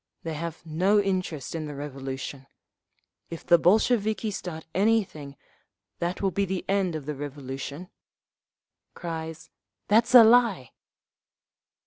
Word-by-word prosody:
They 165 - -4
have 165 +1 -6
no 185 +6 +2
interest 185 -8 -2
in 160 -2 -4
the 145 - -7
Revolution. 135 -1 -6 0.8
If 165 - -8
the 170 -1 +5
Bolsheviki 215 +3 +2
start 170 -5 -6
anything, 190 -8 0 0.6
that 175 +3 -3
will 195 - +2
be 200 - 0
the 190 -1 -4
end 195 -4 +1
of 150 -3 -5
the 150 - -3
Revolution…" 140 +3 -7 1.1
(Cries, 160 -1 -6 0.4
"That's 230 +4 +4
a 240 - +12
lie!)" 225 - +4
170 Hz, 120 wpm, -26 LUFS, 150-200 Hz, 1.1 s, a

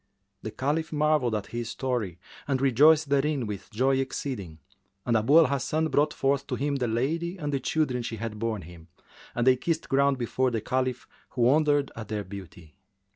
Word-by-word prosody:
The - - -5
Caliph 150 +7 -2
marvelled 150 -6 +2
at 105 -1 -3
his 120 -1 -5
story 120 -10 -2 0.3
and 135 -2 0
rejoiced 145 +4 +5
therein 140 -2 +1
with 100 -2 -6
joy 130 +5 +1
exceeding: 130 - -4 0.5
and 120 - +1
Abu 115 +8 +4
al 165 - +8
Hasan 150 +4 0
brought 150 +1 +2
forth 140 0 0
to - - -2
him 140 0 -1
the 125 -2 -1
lady 160 +10 -1
and 145 -4 -3
the 140 - +1
children 130 -2 0
she 115 -1 -4
had 110 -1 -5
borne 110 -4 -2
him, 85 0 -13 0.5
and 120 - 0
they 130 0 +6
kissed 165 +4 -2
ground 140 0 +3
before 130 +1 0
the 115 -2 -1
Caliph, 130 +2 -2 0.2
who 125 - -1
wondered 145 +2 +3
at 110 -2 -7
their 105 -1 -3
beauty. 90 -5 -11
130 Hz, 185 wpm, -27 LUFS, 115-145 Hz, 0.5 s, al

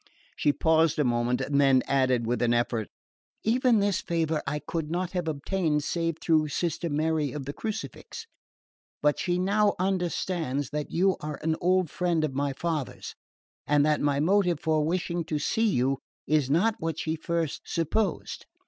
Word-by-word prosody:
She 145 - +2
paused 160 +1 +2
a 150 - +3
moment 120 0 +1
and 140 0 +1
then 135 -2 +4
added 130 -3 +2
with 120 +2 -1
an 120 0 +3
effort: 120 -3 0 0.6
"Even 245 +1 +3
this 200 -2 +1
favour 160 -2 -1
I 145 +2 -1
could 155 0 -4
not 175 +1 -2
have 180 -3 -2
obtained 155 0 0
save 165 0 -1
through 155 -2 +2
Sister 170 +2 -2
Mary 155 -1 0
of 145 -3 -6
the 140 - -5
Crucifix; 220 - -6 0.8
but 150 0 +3
she 175 -1 0
now 205 +3 +2
understands 175 -6 -1
that 150 0 -3
you 190 +2 +2
are 150 -1 -5
an 160 0 +1
old 185 -2 +2
friend 175 -3 0
of 150 -3 -1
my 140 +1 0
father's, 155 -2 -4 0.5
and 145 0 +4
that 150 -1 +2
my 145 -1 +1
motive 180 0 +2
for 155 -2 +1
wishing 170 +1 -1
to 155 - -2
see 225 +9 +1
you 135 -4 +1 0.3
is 150 -3 +1
not 180 +10 +3
what 165 -1 -3
she 160 - -2
at 160 - -7
first 165 -3 -2
supposed." 170 +4 -2
160 Hz, 175 wpm, -27 LUFS, 145-175 Hz, 0.8 s, then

